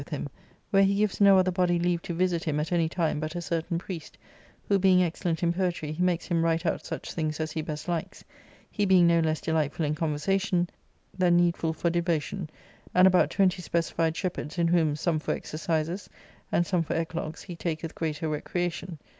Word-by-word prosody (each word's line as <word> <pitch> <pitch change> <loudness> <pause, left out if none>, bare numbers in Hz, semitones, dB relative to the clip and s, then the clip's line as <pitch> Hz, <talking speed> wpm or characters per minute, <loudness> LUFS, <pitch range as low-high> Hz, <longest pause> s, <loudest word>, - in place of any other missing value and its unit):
a!i£luhim_i.where'jie 195 -1 -1
gives 210 -1 0
no 200 -1 +7
other 185 0 +3
body 180 -1 +2
leave 175 0 0
to - - -6
visit 175 -1 +1
him 150 -2 0
at 155 +2 -3
any 165 -2 +2
time 165 -3 0
but 155 +2 -4
a - - -1
certain 170 0 -2
priest, 170 -2 -7 0.5
who 200 -1 +3
being 185 -1 +5
excellent 170 -1 -2
in 170 0 +2
poetry, 175 -4 -1
he 155 +3 -4
makes 180 -1 +1
him 170 -2 +1
write 165 +1 +1
out 165 - 0
such - - -6
things 155 -2 -2
as 160 0 -2
he 160 - -2
best 150 +1 -6
likes, 170 -2 -3 0.5
he 205 - -1
being 185 -3 +5
no 170 0 +4
less 160 -1 +1
delightful 160 -1 0
in 150 - 0
con 155 0 -1
versation 185 +2 +1 0.5
than 180 -2 +3
needful 170 -2 +2
for 170 +1 -1
devotion, 170 0 -1 0.5
and 180 +1 +7
about 185 -1 +4
twenty 190 -2 +2
specified 165 -1 0
shepherds, 180 -4 -4
in 170 -1 +2
whom, 165 -3 +2
some 155 +1 0
for - - -1
exercises, 165 +4 -3 0.4
and 175 - +2
some 180 -1 +1
for 165 - -2
eclogues', 165 -1 -3
he'laketh 165 -3 -4
greater 160 -1 -3
recreation. 175 +3 -3
170 Hz, 190 wpm, -27 LUFS, 160-180 Hz, 0.5 s, no